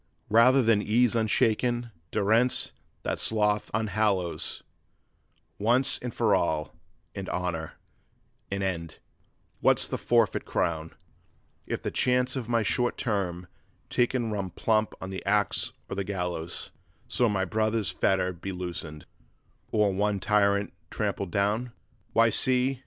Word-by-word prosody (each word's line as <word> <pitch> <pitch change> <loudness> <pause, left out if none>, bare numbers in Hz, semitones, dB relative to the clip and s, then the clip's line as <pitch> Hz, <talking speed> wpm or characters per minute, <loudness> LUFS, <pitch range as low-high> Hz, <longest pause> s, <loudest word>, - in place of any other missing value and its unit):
'Rather 125 +4 +6
than 110 -2 +4
ease 115 +2 +2
unshaken, 115 +2 +1 0.2
durance 115 +5 +2 0.3
that - - -2
sloth 105 -1 +2
unhallows, 105 -4 0 1.0
Once 120 +6 +2
and 125 - -5
for 110 -3 +2
all, 80 -5 0 0.4
in 95 -1 -6
honor, 85 -3 -3 0.8
an 100 0 -2
end: 85 -4 -3 0.6
what's - - +3
the - - -3
forfeit 115 -4 +2
crown 80 -1 -1 0.8
If - - -3
the - - -2
chance 125 +1 +1
of 120 -3 -4
my 115 -1 +2
short 120 +3 0
term 90 -5 -2 0.5
taken 120 -2 +1
run 100 -3 -2
plump 110 +5 0
on 95 - -6
the 95 - -5
axe 105 +1 +1 0.2
or - - -5
the 100 - -1
gallows, 90 -4 -4 0.4
So 120 - +2
one 95 -3 0
brother's 110 -3 0
fetter 95 -1 +1
be 90 +3 -6
loosened, 85 -4 -6 0.7
or 105 -2 +2
one 100 +1 0
tyrant 100 0 +2 0.2
trampled 100 - -2
down? 105 +6 0 0.4
'Why, 115 0 +5
see! 130 +2 +2
105 Hz, 130 wpm, -27 LUFS, 95-115 Hz, 1.0 s, Rather